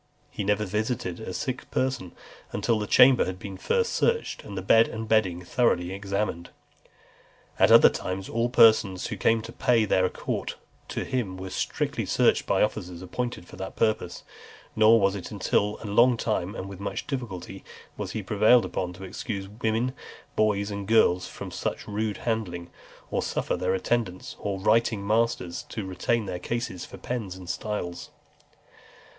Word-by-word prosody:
He 105 Hz, -, -4 dB
never 105 Hz, +2 st, +1 dB
visited 105 Hz, -2 st, -2 dB
a 110 Hz, -, -6 dB
sick 125 Hz, +6 st, -4 dB
person, 130 Hz, -9 st, -1 dB, 0.4 s
until 115 Hz, -2 st, 0 dB
the 105 Hz, -, -3 dB
chamber 125 Hz, +3 st, +6 dB
had 95 Hz, 0 st, -4 dB
been 95 Hz, 0 st, -7 dB
first 470 Hz, -, 0 dB
searched, 465 Hz, -1 st, 0 dB
and 100 Hz, -2 st, -8 dB
the 95 Hz, -, -3 dB
bed 115 Hz, +4 st, +5 dB
and 110 Hz, 0 st, -5 dB
bedding 95 Hz, -5 st, +1 dB
thoroughly 90 Hz, -6 st, +1 dB
examined. 100 Hz, -3 st, -3 dB, 1.1 s
At -, -, +5 dB
other -, -, +9 dB
times, 95 Hz, +1 st, -3 dB
all 115 Hz, +1 st, 0 dB
persons 110 Hz, -6 st, +5 dB
who -, -, -3 dB
came 115 Hz, -1 st, +2 dB
to 115 Hz, -, -8 dB
pay 120 Hz, -3 st, +2 dB
their 95 Hz, -2 st, +2 dB
court -, -, -4 dB, 0.3 s
to -, -, -3 dB
him 110 Hz, -8 st, -2 dB
were 95 Hz, 0 st, -7 dB
strictly -, -, -2 dB
searched -, -, +2 dB
by -, -, +3 dB
officers 90 Hz, -4 st, -3 dB
appointed 120 Hz, 0 st, -4 dB
for -, -, -12 dB
that 95 Hz, 0 st, -6 dB
purpose; 110 Hz, -5 st, 0 dB, 0.5 s
nor 110 Hz, +1 st, +6 dB
was 100 Hz, -1 st, +3 dB
it 100 Hz, -3 st, -6 dB
until 105 Hz, 0 st, 0 dB
after 110 Hz, -, -8 dB
a 100 Hz, -, -4 dB
long 120 Hz, +2 st, +5 dB
time, 105 Hz, -3 st, -1 dB
and 95 Hz, -, -5 dB
with 100 Hz, -1 st, -9 dB
much 100 Hz, -, -4 dB
difficulty, 95 Hz, -8 st, -5 dB, 0.3 s
that -, -, -5 dB
he 110 Hz, -, -3 dB
was -, -, -15 dB
prevailed 110 Hz, +4 st, +5 dB
upon 90 Hz, -1 st, -3 dB
to 90 Hz, +2 st, -11 dB
excuse 95 Hz, +1 st, -5 dB
women, 110 Hz, +4 st, -1 dB, 0.4 s
boys, 105 Hz, -1 st, +1 dB
and 100 Hz, -1 st, -5 dB
girls 100 Hz, -5 st, +4 dB
from -, -, -8 dB
such -, -, -4 dB
rude 105 Hz, 0 st, -2 dB
handling, 90 Hz, -7 st, -2 dB, 0.4 s
or -, -, 0 dB
suffer -, -, -1 dB
their 90 Hz, +1 st, 0 dB
attendants 95 Hz, -3 st, -2 dB
or 100 Hz, -2 st, -3 dB
writing 110 Hz, 0 st, +2 dB
masters 110 Hz, -5 st, 0 dB
to 110 Hz, -3 st, -4 dB
retain 105 Hz, +5 st, -1 dB
their 90 Hz, -2 st, -4 dB
cases 115 Hz, -3 st, -4 dB
for -, -, -11 dB
pens 110 Hz, -7 st, -4 dB
and 95 Hz, -1 st, -11 dB
styles. 90 Hz, -5 st, -4 dB
105 Hz, 175 wpm, -26 LUFS, 95-115 Hz, 1.1 s, other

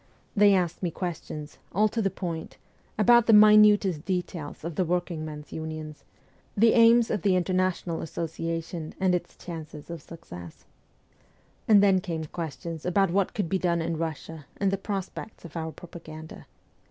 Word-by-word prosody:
They 205 Hz, -1 st, +6 dB
asked 175 Hz, -2 st, -1 dB
me 180 Hz, -, 0 dB
questions, 160 Hz, -3 st, -6 dB
all 210 Hz, +4 st, +4 dB
to 225 Hz, -, -2 dB
the 195 Hz, -, +1 dB
point, 170 Hz, -4 st, -6 dB, 0.4 s
about 235 Hz, +2 st, +5 dB
the 225 Hz, -, +6 dB
minute 210 Hz, -5 st, +6 dB
details 180 Hz, -6 st, -4 dB
of 170 Hz, +1 st, -4 dB
the 185 Hz, -, +1 dB
working 175 Hz, -2 st, -2 dB
men's 150 Hz, -1 st, -8 dB
unions, 155 Hz, -1 st, -6 dB, 0.5 s
the 225 Hz, +2 st, +5 dB
aims 230 Hz, 0 st, +6 dB
of 205 Hz, -, -1 dB
the 190 Hz, +1 st, +3 dB
International 185 Hz, -2 st, 0 dB
Association 165 Hz, 0 st, -4 dB
and 190 Hz, -1 st, +2 dB
its 180 Hz, -, -2 dB
chances 160 Hz, -2 st, -8 dB
of 170 Hz, -3 st, -6 dB
success, 90 Hz, -, -11 dB, 1.0 s
and 205 Hz, -2 st, +7 dB
then 190 Hz, -2 st, +4 dB
came 165 Hz, -4 st, -4 dB
questions 165 Hz, 0 st, -6 dB
about 185 Hz, 0 st, +2 dB
what 195 Hz, +1 st, 0 dB
could 205 Hz, -5 st, -1 dB
be 190 Hz, +3 st, 0 dB
done 170 Hz, -2 st, +1 dB
in 165 Hz, 0 st, -2 dB
Russia, 160 Hz, -1 st, -5 dB
and 195 Hz, -1 st, +1 dB
the 195 Hz, -, 0 dB
prospects 195 Hz, 0 st, -6 dB
of 170 Hz, -, -11 dB
our 160 Hz, -1 st, -3 dB
propaganda. 160 Hz, -2 st, -11 dB
175 Hz, 160 wpm, -27 LUFS, 160-195 Hz, 1.0 s, and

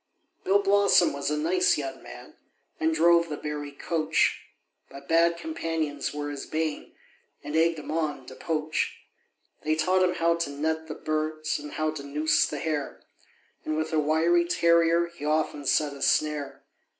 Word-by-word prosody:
Bill 195 Hz, +2 st, +4 dB
Blossom 200 Hz, -3 st, +4 dB
was 140 Hz, 0 st, -2 dB
a 150 Hz, -, -1 dB
nice 180 Hz, +4 st, +2 dB
young 135 Hz, -2 st, -5 dB
man, -, -, -12 dB, 0.5 s
And 320 Hz, 0 st, +2 dB
drove 170 Hz, -, +4 dB
the 150 Hz, -, -4 dB
Bury 150 Hz, -1 st, -5 dB
coach; 160 Hz, +2 st, 0 dB, 0.4 s
But 140 Hz, 0 st, -12 dB
bad 170 Hz, +1 st, +3 dB
companions 165 Hz, -, -3 dB
were 145 Hz, 0 st, -4 dB
his 140 Hz, -1 st, -7 dB
bane, 155 Hz, -1 st, -3 dB, 0.5 s
And 150 Hz, +1 st, -5 dB
egg'd 165 Hz, 0 st, +3 dB
him 150 Hz, -, -7 dB
on 155 Hz, -4 st, -2 dB
to 130 Hz, -, -10 dB
poach. 155 Hz, +2 st, -2 dB, 0.6 s
They 155 Hz, 0 st, 0 dB
taught 185 Hz, +4 st, +2 dB
him 180 Hz, -1 st, +2 dB
how 170 Hz, 0 st, +2 dB
to 170 Hz, -3 st, -2 dB
net 160 Hz, +3 st, -2 dB
the 155 Hz, -, -6 dB
birds, 155 Hz, 0 st, -2 dB
And 145 Hz, 0 st, -9 dB
how 155 Hz, 0 st, -1 dB
to 155 Hz, -, -7 dB
noose 150 Hz, +3 st, +2 dB
the 150 Hz, -, -5 dB
hare; 150 Hz, -2 st, -3 dB, 0.6 s
And 155 Hz, 0 st, -2 dB
with 155 Hz, +1 st, -2 dB
a 155 Hz, -, +3 dB
wiry 160 Hz, +3 st, +3 dB
terrier, 170 Hz, 0 st, +3 dB
He 170 Hz, -3 st, -12 dB
often 150 Hz, -2 st, -1 dB
set 150 Hz, 0 st, +2 dB
a 140 Hz, -, -11 dB
snare. 150 Hz, -2 st, 0 dB
155 Hz, 170 wpm, -27 LUFS, 150-170 Hz, 0.6 s, Bill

